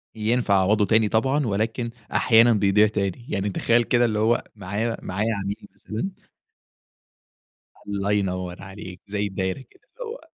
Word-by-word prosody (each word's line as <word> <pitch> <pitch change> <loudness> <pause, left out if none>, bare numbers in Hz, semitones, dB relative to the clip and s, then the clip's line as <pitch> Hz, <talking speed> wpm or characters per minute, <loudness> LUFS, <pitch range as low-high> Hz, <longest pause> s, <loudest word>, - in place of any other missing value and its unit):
ينفع 110 -1 +1
أعوّضه 105 +2 +3
تاني 110 0 +3
طبعًا، 135 +6 +1
ولكن 110 +3 -1 0.2
أحيانًا 115 0 +5
بيضيع 105 +1 +4
تاني. 105 +1 -3
يعني 100 -6 -1
تخيَّل 120 +4 +2
كده 120 +1 +2
اللي 110 -2 0
هو 115 +2 +2
معايا 105 +4 -3
معايا 105 +5 -1
عميل 100 +2 -5
مثلًا 185 - -6 1.6
الله 100 0 -1
ينوّر 90 -3 -2
عليك، 95 -1 -10
زي 105 0 -1
الدايرة 95 +4 -3
كده. - - -25 0.2
اللي 480 -3 -5
هو - - -8
105 Hz, 145 wpm, -24 LUFS, 100-115 Hz, 1.6 s, أحيانًا